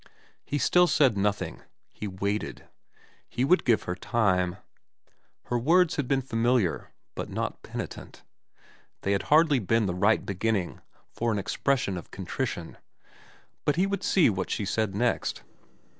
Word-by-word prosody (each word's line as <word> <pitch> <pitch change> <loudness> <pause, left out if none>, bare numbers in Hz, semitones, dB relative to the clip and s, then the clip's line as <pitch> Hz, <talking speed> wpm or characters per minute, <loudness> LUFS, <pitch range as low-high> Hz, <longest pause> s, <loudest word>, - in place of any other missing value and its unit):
He 145 - -2
still 180 +6 +4
said 135 -9 +3
nothing. 105 +1 -1 0.3
He 105 - -6
waited. 100 +2 -3 0.6
He 125 - 0
would 180 +6 +4
give 115 -3 +2
her 90 - -3
time. 90 -2 0 0.9
Her 120 0 -1
words 170 +6 +3
had 145 -4 -1
been 135 -1 +1
familiar, 115 -5 0 0.2
but - - -5
not - - -3
penitent. - - -8 0.8
They 100 - -1
had 100 -1 +2
hardly 150 -2 +5
been 115 +1 +1
the 90 - -1
right 100 +5 +2
beginning 100 -1 -1 0.3
for 115 0 -1
an 105 - 0
expres 130 +7 0
sion 95 -2 -2
of - - -13
contrition; 95 -1 -4 0.9
but 145 - +1
he 180 +3 +2
would 195 -1 -2
see 185 -4 +4
what 95 -4 -1
she 105 - -2
said 100 0 -1
next. 120 +2 -1
115 Hz, 150 wpm, -27 LUFS, 100-140 Hz, 0.9 s, hardly